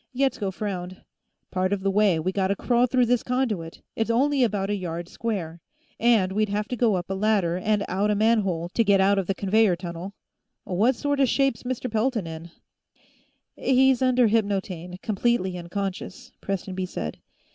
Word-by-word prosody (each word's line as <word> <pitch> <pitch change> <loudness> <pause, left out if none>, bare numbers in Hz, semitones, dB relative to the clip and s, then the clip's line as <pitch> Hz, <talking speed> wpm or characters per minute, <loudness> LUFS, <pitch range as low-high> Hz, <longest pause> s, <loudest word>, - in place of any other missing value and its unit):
Yetsko 255 -6 0
frowned. 185 -2 -5 0.5
"Part 185 0 0
of 200 -1 0
the 195 0 +1
way, 200 -3 +3
we 185 +4 -1
gotta 195 0 0
crawl 245 +3 +2
through 250 0 +3
this 240 -1 +2
conduit; 225 -10 -2
it's 225 0 -1
only 270 +3 +2
about 205 -3 0
a - - +1
yard 170 -3 -5
square. 175 -7 -4 0.4
And 225 -6 +3
we'd 215 +1 0
have 210 +1 -2
to 250 - -2
go 230 -4 +2
up 180 +1 -4
a - - +1
ladder, 195 -4 +1
and 210 +1 0
out 200 +3 0
a 210 - +2
manhole, 200 -6 +1
to 230 - +1
get 200 -2 +4
out 195 +1 +4
of 190 - -3
the 195 - 0
conveyor 200 -1 +3
tunnel. 175 +2 -7 0.5
What 215 +8 +1
sorta 285 +1 +1
shape's 270 -1 +1
Mr. 255 0 -3
Pelton 225 -2 0
in?" 165 +1 -8 1.1
"He's 265 0 +3
under 255 -1 +4
hypnotaine, 195 -5 -1
completely 210 -3 0
unconscious," 195 +7 -5
Prestonby 190 -1 -3
said. 80 - -5
205 Hz, 170 wpm, -25 LUFS, 185-235 Hz, 1.1 s, get